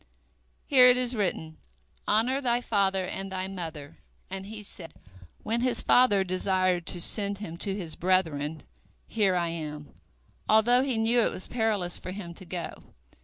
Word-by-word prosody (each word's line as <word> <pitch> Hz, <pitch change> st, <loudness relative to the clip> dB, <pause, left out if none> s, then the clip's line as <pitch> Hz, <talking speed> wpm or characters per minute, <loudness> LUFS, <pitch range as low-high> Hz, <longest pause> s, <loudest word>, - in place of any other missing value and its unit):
Here 255 Hz, -4 st, +7 dB
it 250 Hz, 0 st, +6 dB
is 250 Hz, 0 st, +1 dB
written, 160 Hz, -6 st, -2 dB, 0.5 s
Honor 245 Hz, +6 st, +2 dB
thy 240 Hz, -2 st, +1 dB
father 195 Hz, -5 st, 0 dB
and 195 Hz, +1 st, -5 dB
thy 185 Hz, 0 st, -3 dB
mother, 165 Hz, -5 st, -7 dB, 0.3 s
and 195 Hz, 0 st, -6 dB
he 210 Hz, 0 st, -8 dB
said, 170 Hz, -5 st, -9 dB, 0.5 s
when 230 Hz, +2 st, -1 dB
his 250 Hz, 0 st, +2 dB
father 225 Hz, -6 st, +4 dB
desired 185 Hz, -1 st, 0 dB
to 175 Hz, -, -3 dB
send 200 Hz, +3 st, +1 dB
him 180 Hz, -5 st, -7 dB
to 195 Hz, +2 st, -3 dB
his 170 Hz, -6 st, -4 dB
brethren, 160 Hz, -5 st, 0 dB, 0.4 s
Here 200 Hz, -4 st, +1 dB
am 160 Hz, -4 st, -4 dB
I, -, -, -28 dB, 0.6 s
although 240 Hz, +3 st, +5 dB
he 265 Hz, -3 st, 0 dB
knew 230 Hz, +2 st, +3 dB
it -, -, +1 dB
was 185 Hz, -, -4 dB
perilous 215 Hz, -7 st, 0 dB
for -, -, -8 dB
him 185 Hz, -2 st, -7 dB
to 185 Hz, -, -11 dB
go. 175 Hz, 0 st, -6 dB
195 Hz, 165 wpm, -27 LUFS, 175-225 Hz, 0.6 s, Here